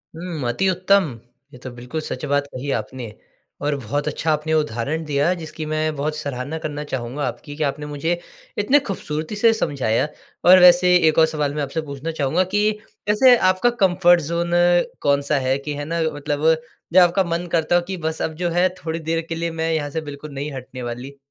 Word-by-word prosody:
हुँ, 165 -6 -4
अति 190 +11 0
उत्तम। 185 - +2 0.3
ये 125 - -11
तो 130 - -5
बिल्कुल 125 +6 -6
सच 155 - -6
बात 145 0 +1
कही 130 +2 -5
आपने। 110 +1 -4 0.5
और 145 0 0
बहुत 140 +4 -3
अच्छा 155 +1 -1
आपने 155 +1 -1
उदाहरण 150 +1 -1
दिया 150 +4 +1
जिसकी 160 -2 -7
मैं 155 0 -1
बहुत 150 +2 -2
सराहना 140 +1 -4
करना 150 -1 -4
चाहूँगा 130 0 -4
आपकी 145 - -7
कि 155 - -2
आपने 150 +1 -2
मुझे 160 +4 -2 0.4
इतनी 285 +2 +4
ख़ूबसूरती 160 - -4
से 225 +2 +4
समझाया। 140 - 0 0.4
और 185 +1 +9
वैसे 180 0 +7
एक 155 - +2
और 160 - +7
सवाल 150 -3 -2
मैं 150 - -1
आपसे 145 +4 -3
पूछना 145 +2 -5
चाहूँगा 160 +4 +1
कि 210 +1 +3 0.4
वैसे 245 +4 +6
आपका 185 +5 +3
कम्फ़र्ट 175 -2 +5
ज़ोन 170 +3 -2 0.5
कौन-सा 140 +1 +2
है? 130 +1 +1
कि 145 +1 -5
है 145 0 -5
ना 165 +1 -2
मतलब 145 +1 -3 0.5
जो 185 - +8
आपका 180 +2 +3
मन 170 +1 -2
करता 165 +1 +2
हो 175 - +4
कि 190 -1 -4
बस 160 -1 -3
अब 160 - -1
जो 175 - +1
है 175 +2 +3 0.2
थोड़ी 160 +1 -2
देर 165 +1 -1
के 165 - -2
लिए 170 0 -2
मैं 165 0 -2
यहाँ 145 -2 -1
से 160 +3 -3
बिल्कुल 145 0 -8
नहीं 145 +2 -4
हटने 130 -1 -8
वाली? 125 +4 -6
155 Hz, 200 wpm, -21 LUFS, 140-170 Hz, 0.5 s, और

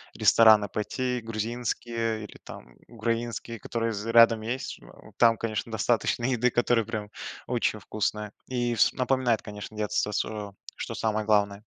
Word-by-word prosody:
в - - -12
рестораны 110 -3 +6
пойти 125 +5 -2
грузинские 115 0 -3
или - - -11
там 60 0 -11
украинские, 115 0 -3
которые 115 +2 -2
з 105 +1 -4
рядом 115 -1 +7
есть. 120 +4 -4
Ж - - -21
о - - -16
там, 115 -1 +5
конечно, 110 0 -3
достаточно 115 +2 +1
еды, 125 -1 +2
которая 120 -2 +2
прям 110 -2 -5 0.4
очень 120 -3 0
вкусная 105 0 -3 0.2
и 120 -2 -1
вс 110 - +4
напоминает, 130 -3 +1
конечно, 105 +1 -8
детство 105 0 -1
своё, 105 -1 -3 0.2
что - - -5
самое 110 -1 -1
главное. 100 -1 +2
115 Hz, 155 wpm, -27 LUFS, 105-120 Hz, 0.4 s, рядом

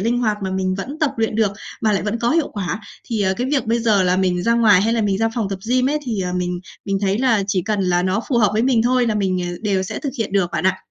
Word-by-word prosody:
linh 235 +4 +1
hoạt 215 -3 +1
mà 190 - -2
mình 185 0 -1
vẫn 270 +11 -6
tập 305 -4 +1
luyện 225 -1 0
được, 215 -3 +2 0.3
mà 215 -2 +2
lại 195 - 0
vẫn 215 +3 -2
có 235 +1 +1
hiệu 320 -2 +2
quả. 200 0 -3 0.2
Thì, 225 -3 -3
ờ, 190 -1 +1
cái 250 - -1
việc 275 -6 0
bây 230 +1 +1
giờ 215 -4 +3
là 180 0 +2
mình 180 -2 +1
ra 230 0 +2
ngoài, 210 -5 +5
hay 225 +2 +1
là 230 - +1
mình 200 -2 0
ra 225 0 +2
phòng 220 -5 -1
tập 195 -1 -4
gym 255 +1 +2
ấy 300 - 0
thì, 220 -6 -2
à, 180 0 -3
mình 180 0 -2 0.2
mình 195 -1 -1
thấy 200 +1 0
là 235 -6 +2
chỉ 195 -3 0
cần 210 0 -1
là 180 -1 +1
nó 190 +4 0
phù 245 -4 +2
hợp 210 -4 +4
với 220 +2 +1
mình 245 -3 +3
thôi 250 0 +2
là 220 - 0
mình, 185 -3 0
à, 175 - -3
đều 195 -3 +1
sẽ 185 - -5
thực 280 -3 -4
hiện 210 -3 -2
được 190 -3 +1
bạn - - -2
ạ. 190 0 +2
210 Hz, 315 wpm, -20 LUFS, 190-235 Hz, 0.3 s, ngoài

